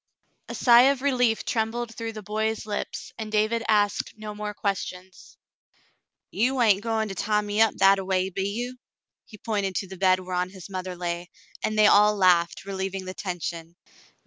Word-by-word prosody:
A - - -5
sigh 245 +1 +6
of 275 -1 -1
relief 250 -5 +1
trembled 225 +1 -2
through 230 0 -5
the 215 -1 -8
boy's 220 +2 -2
lips, 210 -1 -5
and 215 -1 -5
David 215 +2 +1
asked 205 0 +1
no 215 -1 -7
more 210 0 -5
questions. 185 -2 -5 0.9
"You 255 +4 0
hain't 210 -5 +4
goin' 220 -1 -1
to - - -4
tie 210 +2 0
me 210 +1 -1
up 225 - +4
that 195 0 +5
a - - -4
way, 190 0 0
be 195 +2 -2
you.^^" 245 +4 -4 0.5
He 215 - -14
pointed 200 -3 -2
to 195 - -2
the 190 0 -10
bed 185 0 +3
whereon 180 0 -2
his 190 0 -12
mother 185 -1 -5
lay, 175 0 -4 0.3
and 215 - -1
they 215 - +6
all 210 +1 +6
laughed, 180 -2 +2
relieving 190 -1 -4
the 185 - -6
tension. 170 -3 -5
205 Hz, 180 wpm, -25 LUFS, 185-220 Hz, 0.9 s, sigh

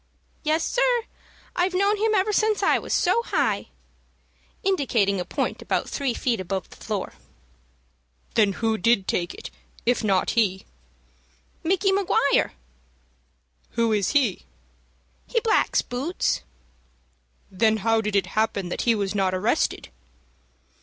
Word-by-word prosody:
"Yes, 315 +1 +1
sir. - - +2 0.5
I've 365 +1 +1
knowed 400 +2 +2
him 435 0 +2
ever 410 +2 +2
since 430 0 +2
I - - +4
was - - -8
so 465 - +3
high," - - 0 1.0
indicating 240 - +1
a 180 - -3
point - - -2
about - - -1
three 270 -4 -2
feet 235 -5 0
above 185 -1 -3
the - - -13
floor. - - -4 1.2
"Then 205 -3 +3
who 220 +1 -1
did 210 -1 +2
take 175 -1 -1
it, - - -9 0.3
if 245 0 +2
not 195 -3 +2
he?" 195 -5 +1 1.0
"Micky 380 +3 +2
Maguire." 385 -7 +2 1.2
"Who 230 -1 +2
is 205 +2 +1
he?" 260 -10 +2 0.9
"He 470 - +1
blacks 450 - +2
boots." 265 - -1 1.1
"Then 220 +3 +2
how 225 -1 +3
did 210 -1 -2
it 200 - +3
happen 215 -4 0
that - - -3
he 235 -1 +3
was 200 -2 -2
not 190 -2 +1
arrested?" 185 - 0
230 Hz, 135 wpm, -24 LUFS, -, 1.2 s, I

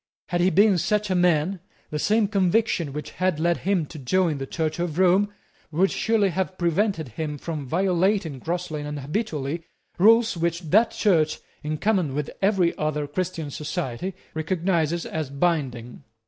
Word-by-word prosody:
Had 175 -1 +1
he 180 - +4
been 200 -1 +4
such 210 +2 0
a - - +2
man, 175 +1 +2 0.3
the 150 - -2
same 215 +5 +2
conviction 195 -5 +1
which 150 +2 -6
had 185 -4 0
led 170 +1 +2
him 185 -4 0
to 155 +1 -10
join 160 +3 +1
the 135 - -4
Church 160 +1 -2
of 170 -2 -2
Rome 190 +3 +4 0.4
would 185 +5 +2
surely 220 -3 +2
have 185 +1 -2
prevented 175 - 0
him 150 +5 -4
from 150 -2 -5
violating 180 -2 +1
grossly 165 0 -3
and 145 0 -5
habitually 155 - -3 0.4
rules 225 +2 +5
which 170 0 -1
that 225 +4 +5
Church, 165 -7 +2 0.2
in 155 0 -3
common 185 -8 +1
with 150 0 -2
every 190 -4 +2
other 150 -1 -1
Christian 160 0 -3
society, 150 +3 -4 0.2
recognises 170 0 0
as 155 -4 -3
binding. 140 -6 -2
170 Hz, 160 wpm, -24 LUFS, 150-190 Hz, 0.4 s, rules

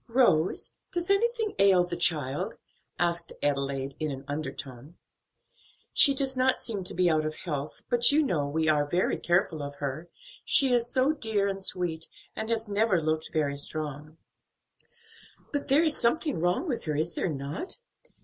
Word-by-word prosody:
"Rose, 230 -10 +2 0.2
does 350 +1 -1
anything 445 +1 +1
ail 195 -2 +5
the 175 0 -4
child?" 150 -5 +3 0.4
asked 170 0 +1
Adelaide, 140 -1 -1
in 155 -1 -2
an 135 -1 -7
undertone. 145 -1 -7 1.0
"She 275 - +6
does 270 -1 0
not 255 0 +1
seem 210 -5 -4
to - - -2
be 180 0 +2
out 155 -2 +2
of 155 0 -4
health; 150 -4 -6
but 240 +1 +5
you 305 +2 +3
know 160 - -1
we 160 +2 -1
are 150 -2 +2
very 175 +5 0
careful 175 -3 0
of 145 0 -6
her; 145 +4 -5 0.3
she 265 -3 +5
is 240 0 +1
so 260 +3 +2
dear 220 -9 0
and 195 -1 -4
sweet, 170 -4 0 0.3
and 220 - -5
has 225 -1 -1
never 205 -2 +1
looked 155 0 -2
very 145 -3 -1
strong." 150 +1 -4 1.4
"But 285 0 -2
there 285 +4 +4
is 315 -2 +1
something 290 - +1
wrong 175 - 0
with 255 -6 -3
her, 155 -2 -2
is 160 +3 0
there - - -2
not? 145 - -5
175 Hz, 170 wpm, -27 LUFS, 150-240 Hz, 1.4 s, She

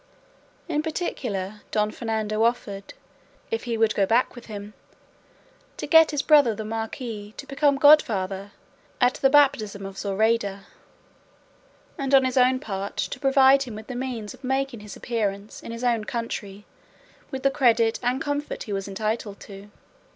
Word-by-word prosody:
In 300 -3 0
particular 215 - -4
Don 210 0 0
Fernando 220 -2 -2
offered, 215 -4 -1 0.6
if 455 - -2
he 235 -2 -2
would 220 -1 +3
go 195 -1 +1
back 235 +4 +2
with 240 - -12
him, 205 -1 -8 1.0
to - - -4
get 320 -1 +6
his 295 -2 -1
brother 285 -8 +5
the 215 - -6
marquis 225 -1 -5
to - - -7
become 280 +1 +2
godfather 205 -10 +4 0.5
at 250 0 +4
the 270 - +2
baptism 220 -9 +3
of 195 0 -8
Zoraida, 200 -1 0 1.3
and 275 0 +2
on 265 -1 +5
his 255 - -1
own 255 0 +4
part 200 -4 -5
to - - -3
provide 270 0 +5
him 245 -5 -5
with 215 0 -9
the 250 - -7
means 245 -4 -4
of - - -18
making 265 -2 -1
his 210 0 -10
appearance 210 -3 -3
in - - -8
his 230 +1 -6
own 235 -3 +1
country 210 -4 -5 0.6
with 265 0 -6
the 275 - +3
credit 235 -5 +3
and 245 +2 0
comfort 290 +1 -3
he 210 - -5
was 195 0 -3
entitled 210 +1 -3
to. 200 0 -11
230 Hz, 160 wpm, -25 LUFS, 205-265 Hz, 1.3 s, get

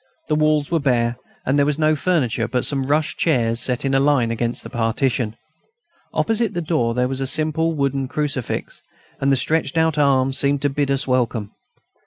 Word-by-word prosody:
The 150 - +2
walls 155 -1 +1
were 165 - +2
bare, 120 -4 +1 0.3
and 140 +3 +2
there 140 - +4
was 150 -1 0
no 155 0 +2
furniture 135 -9 0
but 125 +2 0
some 135 -2 +1
rush 150 +3 +1
chairs 115 -7 +1
set 125 +2 0
in 135 - 0
a 135 - +4
line 135 -5 +2
against 115 +1 -2
the - - -8
partition. 115 0 -1 0.8
Opposite 225 -3 0
the - - 0
door, 135 -8 0
there 125 0 +1
was 135 +1 -3
a 135 - 0
simple 155 +3 +1
wooden 140 -2 -1
crucifix, 140 -3 -3 0.4
and 135 0 +1
the - - +4
stretched 155 +3 0
out 160 -2 +2
arms 135 -2 +2
seemed 140 0 +1
to 145 - +1
bid 140 0 -1
us 140 0 +1
welcome. 120 -5 -1
140 Hz, 195 wpm, -21 LUFS, 125-155 Hz, 0.8 s, there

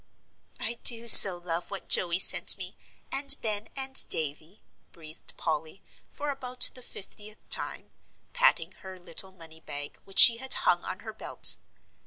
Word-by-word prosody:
"I 235 +1 -6
do 235 0 0
so 195 -5 +9
love 175 0 -9
what 195 - -11
Joey 170 -1 +1
sent - - +3
me, - - -9 0.4
and 280 0 -1
Ben 215 -1 -7
and 265 -1 -1
Davie," 155 +5 -5 0.3
breathed 155 -2 -12
Polly, 160 +3 -8 0.2
for 295 0 -9
about 255 -2 +2
the 255 - -14
fiftieth 210 -1 -14
time, - - -6 0.4
patting - - -2
her 190 -1 -15
little 180 +2 -6
money 165 -3 -18
bag 145 -2 -9
which 195 - -12
she 230 -1 +7
had 265 +2 -1
hung 175 -1 -2
on 190 - -11
her 220 0 -13
belt. 215 - +4
195 Hz, 155 wpm, -23 LUFS, 170-235 Hz, 0.4 s, so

